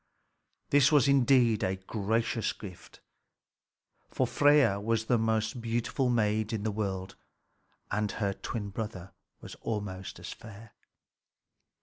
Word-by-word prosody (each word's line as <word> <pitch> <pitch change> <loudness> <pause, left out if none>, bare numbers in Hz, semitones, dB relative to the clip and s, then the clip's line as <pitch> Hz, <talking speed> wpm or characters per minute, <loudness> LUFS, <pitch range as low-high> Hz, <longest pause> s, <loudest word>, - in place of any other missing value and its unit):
This 140 0 +5
was 145 -3 +5
indeed 125 -5 +4
a 95 - 0
gracious 110 +4 -1
gift; 95 -5 -12 1.1
for - - 0
Freia 145 -9 +4
was 115 +1 0
the 120 0 +2
most 110 +1 0
beautiful 120 +3 -1
maid 110 -2 +1
in 105 -2 -2
the 110 - 0
world, 95 -3 -3 0.8
and 105 0 0
her 100 -3 -1
twin 105 0 -5
brother 100 -3 -6 0.3
was - - -9
almost 100 -4 -4
as - - -7
fair. 110 0 -13
110 Hz, 120 wpm, -29 LUFS, 100-120 Hz, 1.1 s, This